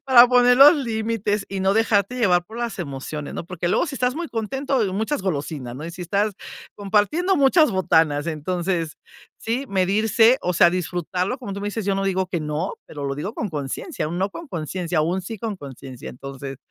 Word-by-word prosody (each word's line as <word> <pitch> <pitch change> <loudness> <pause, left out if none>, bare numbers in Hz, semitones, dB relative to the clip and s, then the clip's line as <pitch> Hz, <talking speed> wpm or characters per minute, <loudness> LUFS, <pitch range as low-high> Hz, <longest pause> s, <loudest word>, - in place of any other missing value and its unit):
Para 250 -3 +8
poner 245 0 +5
los 290 +4 +9
límites 220 -5 -1
y 195 -1 -4
no 190 +1 +3
dejarte 220 +1 +2
llevar 180 -7 +3
por 220 +6 -10
las 235 -4 -3
emociones, 145 -1 -5
¿no? - - -5
Porque 175 -1 -3
luego, 190 - +2
si 295 - -5
estás 250 -1 0
muy 335 +1 -4
contento, 235 -1 -1
muchas 220 +6 -1
golosinas, 145 -8 -3
¿no? 150 - -7
Y - - -5
si 180 - -7
estás 200 +5 0 0.4
compartiendo 215 - +1
muchas 285 +1 +5
botanas, 160 -6 +2
entonces 170 +1 -2 0.4
sí, 240 +4 -2
medirse, 215 +6 +3
o 180 - -1
sea, 175 - +6
disfrutarlo, 180 - -2
como 240 -6 -6
tú 200 - -5
me 205 - -3
dices, 210 0 -4
yo 200 0 +1
no 195 - -1
digo 190 -1 0
que 175 -2 -3
no, 150 +4 -2
pero 145 -2 -7
lo 140 0 -2
digo 155 +9 -4
con 220 - -3
conciencia, 150 - -4
o - - -7
un 175 - -3
no 190 +2 +1
con 335 +9 -9
conciencia, 170 - -2
o - - +1
un 180 +4 -1
sí 220 +4 -7
con 215 0 -4
conciencia. 135 -3 -9
Entonces, 135 +1 -8
195 Hz, 210 wpm, -23 LUFS, 165-230 Hz, 0.4 s, los